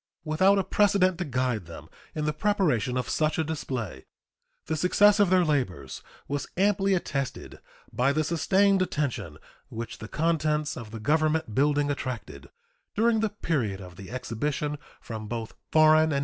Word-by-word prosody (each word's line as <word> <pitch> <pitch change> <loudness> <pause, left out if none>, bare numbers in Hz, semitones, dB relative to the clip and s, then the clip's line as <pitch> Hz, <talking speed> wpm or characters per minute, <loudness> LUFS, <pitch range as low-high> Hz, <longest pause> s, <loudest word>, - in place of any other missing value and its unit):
Without 190 +6 +3
a 195 - +2
precedent 185 -3 +2
to 180 - -1
guide 125 - -1
them 85 - -10 0.3
in 155 -1 -2
the 150 - 0
preparation 150 - +1
of 125 - -2
such 155 +1 0
a 160 - +1
display, 125 - -5 0.6
the 160 - -1
success 205 +6 +4
of 205 -3 +4
their 185 -1 +4
labors 95 - -2 0.3
was 140 -1 -3
amply 195 0 +3
attested 140 -6 -4 0.3
by 125 +3 +2
the 155 +2 +1
sustained 190 +5 +2
attention 140 - -2 0.3
which 115 +1 -6
the 110 - -7
contents 155 0 0
of 115 -3 -8
the 115 +1 -7
Government 155 +1 +1
building 145 +3 +2
attracted 130 -4 -6 0.5
during 225 +1 +3
the 220 0 +1
period 135 - -2
of 90 -2 -11
the 95 +1 -10
exhibition 130 +4 -3 0.2
from 110 -2 -7
both 115 0 -5 0.2
foreign 155 0 +6
and 160 - +2
native - - -1
visitors. - - +2
150 Hz, 165 wpm, -27 LUFS, 120-175 Hz, 0.6 s, foreign